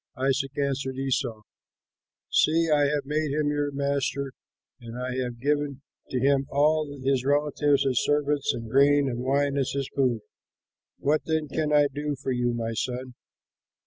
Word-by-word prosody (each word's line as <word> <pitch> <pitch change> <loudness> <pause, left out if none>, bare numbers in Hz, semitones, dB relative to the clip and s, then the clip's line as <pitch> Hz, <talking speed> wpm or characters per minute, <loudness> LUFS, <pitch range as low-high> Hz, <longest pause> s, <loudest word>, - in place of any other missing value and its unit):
Isaac 135 +1 0
answered 135 -2 -1
Esau, 130 -4 -1 0.9
"See, 165 +1 +3
I 145 -1 +4
have 145 0 -1
made 150 +1 -1
him 150 0 +1
your 145 0 0
master 140 -1 -1 0.5
and 115 -1 -9
I 125 0 -3
have 120 -1 -5
given 145 0 -1 0.3
to 130 - -1
him 135 +1 +2
all 150 +1 +2
his 135 -1 +1
relatives 145 0 +2
as 130 -3 +2
servants 145 -1 +1
and 115 -1 -6
grain 140 +3 +4
and 120 -2 -3
wine 140 +2 +1
as 135 - -1
his 140 -1 -2
food. 125 -5 +1 0.8
What 150 +2 0
then 160 -1 0
can 150 +1 -1
I 145 -1 +5
do 145 +1 -3
for 135 0 -4
you, 120 -1 +1
my 115 -1 -3
son?" 125 +2 -3
140 Hz, 160 wpm, -26 LUFS, 130-145 Hz, 0.9 s, I